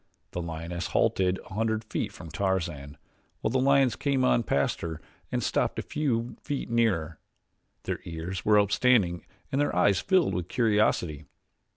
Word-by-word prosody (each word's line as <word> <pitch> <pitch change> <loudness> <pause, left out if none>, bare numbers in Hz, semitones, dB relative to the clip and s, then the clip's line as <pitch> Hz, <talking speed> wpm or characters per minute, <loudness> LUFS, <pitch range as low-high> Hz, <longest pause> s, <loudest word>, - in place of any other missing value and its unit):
The 90 - -3
lioness 85 +1 -4
halted 95 0 +1
a - - -11
hundred 110 +1 0
feet 110 - -3
from 80 - -10
Tarzan, 85 -7 -2 0.4
while 110 - 0
the 130 - +2
lions 135 -2 +4
came 135 -3 +1
on 120 - +4
past 70 -10 0
her 80 -2 -4 0.3
and - - -1
stopped - - 0
a - - -2
few 125 -6 -2
feet 140 -4 -4
nearer. 95 -10 +1 0.6
Their - - -3
ears 85 +3 -5
were 105 0 +5
upstanding 100 -4 +3 0.3
and 135 - +1
their 145 - 0
eyes 95 +1 +4
filled 185 - +2
with 85 -1 -2
curiosity. 105 - +1
100 Hz, 160 wpm, -28 LUFS, 85-120 Hz, 0.6 s, were